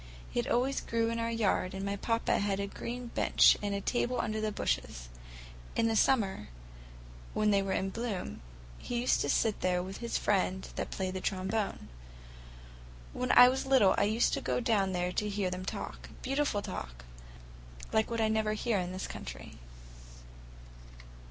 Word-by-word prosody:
It 240 0 0
always 260 +3 +1
grew 230 0 0
in 230 - -2
our 230 0 -1
yard 200 -5 0
and 195 +1 -4
my 200 0 -1
papa 230 +3 0
had 200 -1 0
a 200 - -1
green 240 +4 -6
bench - - +5
and 205 -1 -1
a 200 - -2
table 245 +3 0
under 215 -1 -1
the 215 0 -1
bushes. - - -2 0.7
In 225 -1 +2
summer, 210 - +2 0.9
when 215 0 +3
they 200 -1 +4
were 195 0 -2
in 195 0 -1
bloom, 225 -4 -4 0.4
he 240 -1 -3
used 250 - +2
to - - -1
sit 220 -2 +1
there 180 -1 +1
with 190 +1 -7
his 235 -1 -2
friend 190 -2 0
that - - -3
played 185 -1 -3
the 185 - -4
trombone. 195 +2 -2 1.3
When 250 0 -1
I 245 - +10
was 265 +1 0
little 255 -8 +5
I 200 - +2
used 220 +3 +2
to - - -1
go - - 0
down 210 -6 +1
there 180 0 -1
to 210 +3 -1
hear 200 -2 -1
them 185 0 -5
talk—beautiful 270 0 -3
talk, - - -7 0.9
like 220 0 +2
what 230 -1 -1
I 220 - +3
never 220 -1 +1
hear 215 -1 0
in 180 0 -3
this 185 - -4
country." - - -8
210 Hz, 170 wpm, -31 LUFS, 190-230 Hz, 1.3 s, I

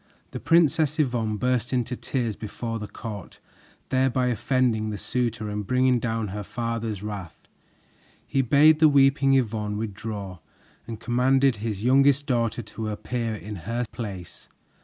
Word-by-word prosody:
The - - -5
Princess 160 -2 +3
Yvonne 120 -7 0
burst 125 0 0
into 125 -1 -1
tears 120 -4 -2
before 115 +2 -5
the 105 - -6
court, 105 -3 -8 0.5
thereby 130 -1 +2
offending 120 -3 +1
the 105 - -4
suitor 115 -1 -2
and 105 -1 -4
bringing 125 -1 +3
down 115 -3 -2
her 105 +2 -5
father's 115 -2 -4
wrath. 100 -5 -7 0.8
He 135 - +1
bade 150 +5 +5
the 155 -1 +7
weeping 135 -1 +4
Yvonne 105 -4 0
withdraw 100 -3 -5 0.5
and 115 -2 -6
commanded 130 +1 +2
his 105 -1 -4
youngest 135 +3 +4
daughter 120 -3 0
to 110 +1 -5
appear 115 +1 -3
in 105 0 -7
her 120 +1 -1
place. 95 -7 -8
115 Hz, 140 wpm, -25 LUFS, 105-130 Hz, 0.8 s, the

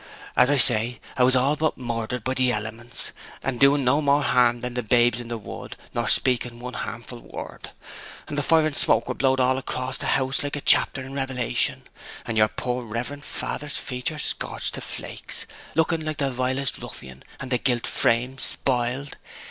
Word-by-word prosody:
As 125 - +6
I 145 - +4
say, 120 -1 +3 0.2
'a 125 - +3
was 130 +1 +5
all 135 +3 +3
but 155 +1 0
murdered 120 -1 -3
by 130 - 0
the 130 -1 +2
elements, 115 +2 -3 0.3
and 130 -3 -2
doing 140 +1 +5
no 135 +4 +3
more 145 0 +3
harm 120 -3 +3
than 125 0 -4
the 125 - -1
babes 120 +1 +3
in 120 - -7
the 120 0 -3
wood, 105 - -8 0.2
nor - - -1
speaking 125 -2 +1
one 125 +1 -6
harmful 120 +1 -6
word. - - -9 0.6
And - - -5
the 145 - +1
fire 160 +2 +4
and 155 -2 -1
smoke - - +4
were - - -1
blowed 135 -1 +2
all 130 +1 +3
across 130 0 -3
house 135 0 +1
like 145 0 -3
a 145 - -4
chapter 135 - +3
in 135 +1 -8
Revelation; 130 -3 -1 0.4
and 115 - -3
your 110 -1 +5
poor 125 +2 -3
reverent 120 +6 -5
father's 145 -1 -3
features 130 +4 -2
scorched - - 0
to - - -5
flakes, - - -5 0.3
looking 160 0 +2
like 155 -1 -3
the 140 -2 0
vilest 130 +2 -1
ruffian, 65 0 -9 0.2
and 130 -1 -6
the 125 - +2
gilt 120 -1 +1
frame 125 +3 +1
spoiled! 130 +2 0
125 Hz, 190 wpm, -24 LUFS, 120-140 Hz, 0.6 s, As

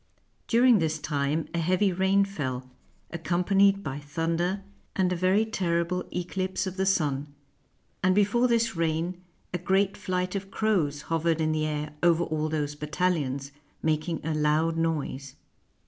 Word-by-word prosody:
During 240 -1 +5
this 160 -1 0
time 150 +1 -1
a 170 - 0
heavy 185 +4 +2
rain 190 +2 +3
fell, 130 -9 -4 0.4
accompanied 195 +4 +2
by 140 0 -4
thunder 165 +6 -1 0.3
and 185 -1 +2
a - - -1
very 185 +5 +3
terrible 180 -4 0
17s - - -21
FRANCE 180 -1 -2
eclipse 185 +1 -2
of 190 0 -5
the 190 - +1
sun; 145 -5 0 0.7
and 185 0 +3
before 210 +5 +3
this 230 -1 +1
rain 165 +2 -1 0.3
a 180 - -1
great 195 +3 +2
flight 185 -2 -2
of 195 -1 -4
crows 175 -10 0
hovered 165 0 0
in 155 0 +1
the 155 0 0
air 150 0 -3
over 170 -1 +4
all 155 -1 -1
those 150 -2 -1
battalions, 150 -3 -1 0.3
mak 155 +1 0
ing 165 - -2
a 160 - 0
loud 155 +2 +2
noise. 150 -5 -2
170 Hz, 160 wpm, -27 LUFS, 155-190 Hz, 0.7 s, During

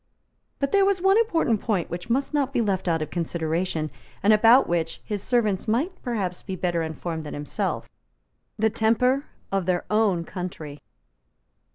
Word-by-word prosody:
But 275 -1 -1
there 400 -1 +5
was 390 -1 +2
one 385 +4 +4
important 325 - +1
point 200 -7 -1
which 175 +5 -6
must 270 +5 0
not 280 -2 +1
be 260 - 0
left 195 -5 0
out 165 -2 +1
of 155 - -8
consideration, 165 -1 -2 0.3
and 210 +2 +6
about 230 +5 +6
which 165 -1 -1
his 205 -2 -3
servants 215 -4 0
might 255 - +1
perhaps 200 -8 -2
be 190 - -5
better 175 -2 -1
informed 160 0 -4
than 150 - -6
himself, 145 0 -3 0.7
the 220 0 +2
temper 250 +6 +2 0.3
of 195 -2 0
their 180 -1 0
own 210 -5 +2
country. 160 -6 -6
200 Hz, 165 wpm, -25 LUFS, 170-245 Hz, 0.7 s, and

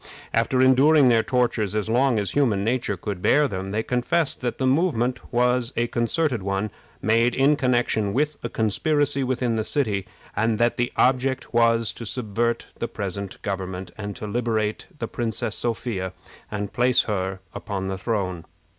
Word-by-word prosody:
After 115 +3 +2
enduring 135 +2 +6
their 115 -2 +5
tortures 110 -4 0
as 105 -1 -1
long 125 +2 +3
as 100 -2 0
human 115 -9 +2
nature 115 -3 0
could 95 0 -5
bear 145 +9 +4
them, 95 -4 -4
they 110 +3 -1
confessed 125 +7 0
that 120 -2 -2
the 130 - 0
movement 130 -4 +1
was 125 0 +2
a 120 - +2
concerted 120 +2 0
one, 100 +2 -2 0.3
made 115 +3 +3
in 140 +3 +4
connection 120 -6 +1
with 150 +6 0
a 120 - -4
conspiracy 140 +6 +1
within 125 -3 0
the 110 - 0
city, 105 -9 0 0.3
and 110 0 +1
that 120 +1 +2
the 120 0 0
object 130 0 +1
was 115 -3 +3
to 115 - -8
subvert 115 0 -1
the 115 - -1
present 100 -2 -5
government, 95 -2 -4
and 105 -1 -6
to 125 - -6
liberate 110 -1 -1
the - - -3
Princess 115 -1 -3
Sophia 110 -6 -2 0.4
and 105 -1 -4
place 125 +1 +3
her 95 -3 -2
upon 95 -2 -4
the 95 0 -3
throne. 95 -6 -2
115 Hz, 165 wpm, -24 LUFS, 105-125 Hz, 0.4 s, enduring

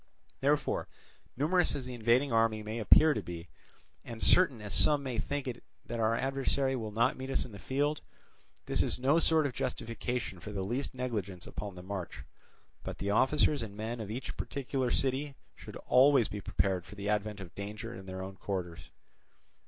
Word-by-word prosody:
Therefore, 145 +1 +1 0.5
numerous 175 +6 +2
as 135 - -3
the 125 - -6
invading 120 +4 +3
army 115 -1 +3
may 110 +2 -4
appear 150 +8 +7
to - - -2
be, 85 -1 -7 0.5
and 115 -2 -8
certain 140 -3 +4
as 105 -2 -6
some 145 -2 +4
may 125 -4 -2
think 140 +5 -2
it 120 -1 -5 0.2
that 120 - -4
our 110 0 +3
adversary 135 +1 0
will 110 -4 -3
not 115 +4 +2
meet 130 0 -6
us 135 - +1
in 125 - -10
the 100 - -10
field, 145 +7 0 0.6
this - - +2
is - - +1
no 135 +6 +3
sort 160 -2 +3
of 140 - -1
justification 115 -3 -3
for 105 +5 -7
the 100 -2 -2
least 120 +7 -2
negligence 105 -8 -3
upon 100 -2 -6
the 90 - -9
march; 95 -2 -5 0.6
but - - -5
the 100 - -1
officers 140 +5 +3
and 105 -3 -6
men 115 +2 -3
of 110 -3 -5
each 120 +5 -4
particular 135 -2 -2
city 135 +3 0 0.2
should - - -10
always 130 -2 +6
be 105 - -5
prepared 95 -2 0
for 105 - -12
the 100 0 -5
advent 105 0 0
of 95 -3 -9
danger 105 +3 -6
in 95 0 -10
their 95 0 -5
own 95 0 -8
quarters. 85 -6 -4
115 Hz, 190 wpm, -32 LUFS, 100-135 Hz, 0.6 s, appear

